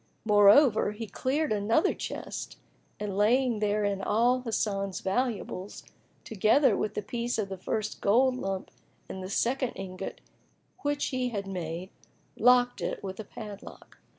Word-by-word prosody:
Moreover, 210 +2 +6
he 225 +2 -6
cleared 270 +8 -1
another 215 +7 +2
chest - - -6 0.4
and 205 -2 -3
laying 235 +3 +3
therein 205 -1 0
all 240 +5 +2
Hasan's 200 -5 -2
valuables, 205 -2 -2 0.4
together 220 +4 +3
with 210 +1 -2
the 210 - -2
piece 240 +3 -2
of 205 -3 -2
the 190 - -5
first 215 +3 -3
gold 250 +5 +4
lump 195 -4 -4 0.4
and 190 - -7
the 185 - -6
second 250 +5 0
ingot 190 0 -6 0.6
which 290 0 -1
he 255 -2 -1
had 200 -4 -4
made 180 -1 -5 0.4
locked 245 +1 +4
it - - -3
with 190 0 -6
a - - -4
padlock. 205 0 -11
210 Hz, 140 wpm, -28 LUFS, 195-245 Hz, 0.6 s, Moreover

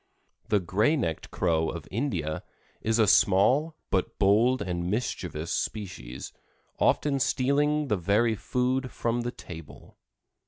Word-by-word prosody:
The 105 - +3
Gray 105 - +2
necked 85 - -2
Crow 80 -3 +1
of 85 -4 -6
India 95 - -2 0.4
is 110 +1 +1
a 110 - +5
small 125 - +4 0.2
but 95 - 0
bold 115 +6 +4
and 90 -1 -3
mischievous 90 -7 -3
species, 70 - -4 0.5
often 140 -2 +2
stealing 145 +4 +1
the 105 - +1
very 105 +6 +2
food 125 +4 -1
from 120 0 -1
the 120 - -2
table. 80 -9 -12
105 Hz, 125 wpm, -27 LUFS, 90-130 Hz, 0.5 s, a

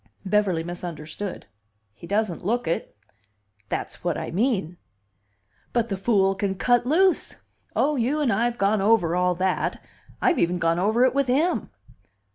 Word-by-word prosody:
Beverly 190 -4 +1
misunderstood. 175 +2 -6 0.5
"He 170 - -12
doesn't 205 -3 -1
look 230 +1 -1
it." 165 -9 -3 0.7
"That's - - -4
what - - 0
I - - -5
mean." 190 - 0 1.0
"But 235 -1 +1
the 195 - -1
fool 195 -1 +2
can 195 0 -2
cut 245 +4 +2
loose!" 365 +6 +2 0.4
"Oh, 295 0 +2
you 260 +6 0
and 270 -7 +2
I 225 +4 +1
have 240 0 -1
gone 200 0 +2
over 195 -5 +3
all 180 0 +2
that! 185 +1 -1 0.4
I've 355 - +2
even 175 +1 +1
gone 165 0 +1
over 220 +6 +3
it 255 - +2
with 275 -1 +1
him." 300 +8 +1
200 Hz, 155 wpm, -24 LUFS, 180-240 Hz, 1.0 s, over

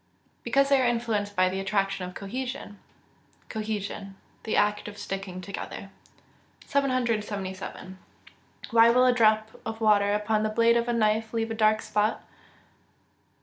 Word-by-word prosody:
_ - - -40
Because 275 +4 +2
they 275 -1 +4
are 250 - +3
influenced 225 -4 -1
by 185 -1 +4
the 190 +1 -2
attraction 195 -1 -1
of 180 - -14
cohesion. 245 0 -6 0.7
Cohesion. 210 -2 -4 0.3
The 220 - -1
act 210 0 +1
of 205 0 -9
sticking 195 -2 -5
together. 195 +1 -7 0.7
777. 210 -8 -2 0.7
_Why 230 0 +6
will 250 +1 +4
a 250 - +5
drop 215 -2 +3
of 220 0 -5
water 205 -2 +3
upon 210 +1 0
the 215 - 0
blade 230 +2 +3
of 235 0 +1
a 240 - 0
knife 220 0 +1
leave 225 0 -1
a - - -1
dark 215 0 +2
spot? 210 +1 0
215 Hz, 145 wpm, -27 LUFS, 200-230 Hz, 0.7 s, Why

